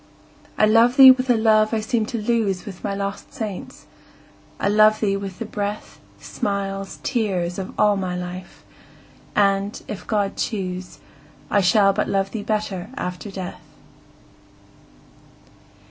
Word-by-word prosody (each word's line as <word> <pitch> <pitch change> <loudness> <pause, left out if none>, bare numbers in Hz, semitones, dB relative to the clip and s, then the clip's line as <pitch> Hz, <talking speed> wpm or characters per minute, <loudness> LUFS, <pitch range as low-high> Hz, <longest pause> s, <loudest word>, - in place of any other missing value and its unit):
I - - +5
love 230 +3 +4
thee 265 -1 +11
with 255 0 0
a 240 - +4
love 220 0 +3
I - - +1
seemed 220 0 -1
to 240 - -3
lose 210 -4 0
With 190 -4 -10
my 200 - -2
lost 200 0 -5
saints,—I 210 -3 -8
love 215 +1 +5
thee 200 -2 +1
with 195 -2 -6
the 230 - -5
breath, 205 0 -5 0.2
Smiles, 195 -1 -4
tears, 190 -8 -1
of 190 - -5
all 210 -1 +4
my 185 -2 -3
life!—and, 195 +2 -4
if 210 - -7
God 205 -3 -1
choose, 185 -4 -4 0.5
I 205 - +4
shall 195 +1 +4
but 210 - -1
love 195 0 0
thee 220 - -4
better 210 -2 -3
after 180 +1 -5
death. 190 -2 -7
205 Hz, 135 wpm, -22 LUFS, 195-215 Hz, 0.5 s, thee